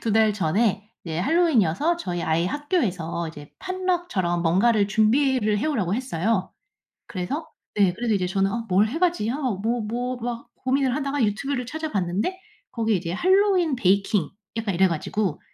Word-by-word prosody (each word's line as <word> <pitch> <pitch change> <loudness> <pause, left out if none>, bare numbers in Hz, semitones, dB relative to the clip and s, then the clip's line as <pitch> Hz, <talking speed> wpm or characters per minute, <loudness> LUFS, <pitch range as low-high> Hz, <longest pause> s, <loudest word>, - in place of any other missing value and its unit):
2 225 - -1
달 220 -1 +4
전에 205 +3 0 0.2
핼러윈이어서 275 - +2
저희 175 - -4
아이 165 +2 +1
학교에서 185 - -1
이제 145 -2 -11
potluck처럼 350 - -1
뭔가를 200 +5 +3
준비를 220 0 +2
해 220 - -1
오라고 205 - 0
했어요. 220 -5 -1 0.6
그래서 205 - -4 0.3
네 195 -4 +3
그래서 230 +3 -1
이제 185 -2 0
저는 195 +1 +1
어 230 +1 -3
'뭘 195 +4 +4
해가지?' 330 -3 0
아 - - -2
뭐 235 -3 -1
뭐 245 +4 -3
막 235 0 -5
고민을 260 -1 0
하다가 280 -2 -1
유튜브를 250 +5 -1
찾아봤는데 240 - -2 0.3
거기에 225 -2 0
이제 170 -1 -4
핼러윈 370 - +3
베이킹 195 -4 +2 0.3
약간 220 -3 -1
이래 190 +2 +5
가지고 175 +1 -2
220 Hz, 365 characters per minute, -24 LUFS, 185-275 Hz, 0.6 s, 이래